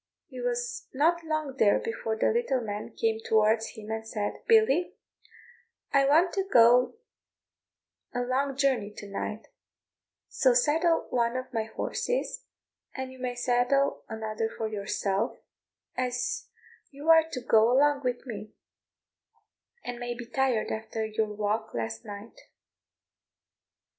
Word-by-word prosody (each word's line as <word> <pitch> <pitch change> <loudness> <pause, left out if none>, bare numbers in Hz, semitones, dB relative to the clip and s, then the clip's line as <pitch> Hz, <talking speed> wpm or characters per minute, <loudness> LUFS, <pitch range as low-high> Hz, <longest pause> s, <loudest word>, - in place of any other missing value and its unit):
He - - -7
was 485 -1 -3
not 335 +5 +2
long 310 -4 -3
there 205 -2 +5
before 225 -1 -3
the 220 - +2
little 455 - +1
man 210 -2 -5
came 225 -1 0
towards 220 +1 +2
him 215 0 -7
and 220 0 -3
said, 210 -2 -2
"Billy, 440 -7 +4 1.0
I 275 0 +5
want 330 +5 +4
to 390 - 0
go 245 - +5 1.2
a 245 - -2
long 265 +2 -1
journey 260 -7 +1
to 205 - -8
night; 210 +2 -5 0.8
so 255 -2 +3
saddle 320 +6 +3
one 235 0 +1
of 255 0 -6
my 225 -2 0
horses, - - -3 0.5
and 265 -1 -5
you 260 - -13
may 250 -1 -3
saddle 245 +3 +1
another 220 0 -3
for 225 - -4
yourself, 200 0 -2 0.6
as 255 - -2 0.4
you 290 +3 +1
are 320 0 +6
to 255 - -2
go 225 -1 +4
along 285 +2 +4
with 250 0 -2
me, 215 -3 -7 1.3
and 245 -1 -5
may 240 0 -4
be 240 0 -7
tired 245 -2 0
after 220 0 -3
your 215 0 -1
walk 210 - -2
last 115 -1 -3
night." 205 +2 -9
245 Hz, 135 wpm, -28 LUFS, 220-280 Hz, 1.3 s, are